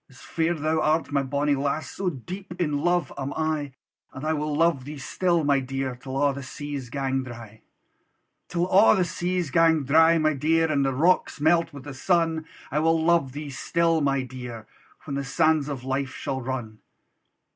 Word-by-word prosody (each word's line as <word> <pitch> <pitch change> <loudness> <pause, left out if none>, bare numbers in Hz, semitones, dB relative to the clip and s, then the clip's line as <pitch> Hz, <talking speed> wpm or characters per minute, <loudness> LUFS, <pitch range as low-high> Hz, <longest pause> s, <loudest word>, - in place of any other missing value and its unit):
As 130 - -17
fair 165 +1 -1
thou 155 +1 0
art, 155 0 +1
my 140 -1 +2
bonnie 140 +2 0
lass, 140 +3 -2
So 190 -1 -2
deep 180 +5 -8
in 150 -4 0
love 175 +2 +1
am 135 +1 -3
I: 155 -3 -1 0.4
And 135 +2 -7
I 160 - +1
will 150 -1 -2
love 165 -4 +2
thee 145 +3 -8
still, 170 +4 0
my 140 -1 +3
dear, 135 -1 -3
Till 130 +2 -6
a' 140 0 +2
the 140 - -6
seas 140 -1 -6
gang 135 0 -1
dry: 115 -4 -10 0.9
Till 175 0 -1
a' 200 +3 +6
the 185 -3 +2
seas 175 -1 -2
gang 165 -1 +4
dry, 160 +4 +5
my 155 -1 +2
dear, 160 +3 +2
And 140 -2 +2
the 135 - +1
rocks 170 +4 +2
melt 165 +2 +3
with 140 -3 -10
the 145 0 -7
sun; 165 +2 0 0.2
I 150 - +1
will 165 +1 +3
luve 160 -5 +2
thee 145 0 -6
still 165 +3 +1
my 140 -2 +1
dear, 125 -3 -8 0.4
When 145 - -6
the 140 0 -2
sands 155 +1 +2
of 135 -3 -5
life 135 0 -2
shall 135 -2 -3
run. 120 -4 -5
145 Hz, 190 wpm, -25 LUFS, 135-165 Hz, 0.9 s, a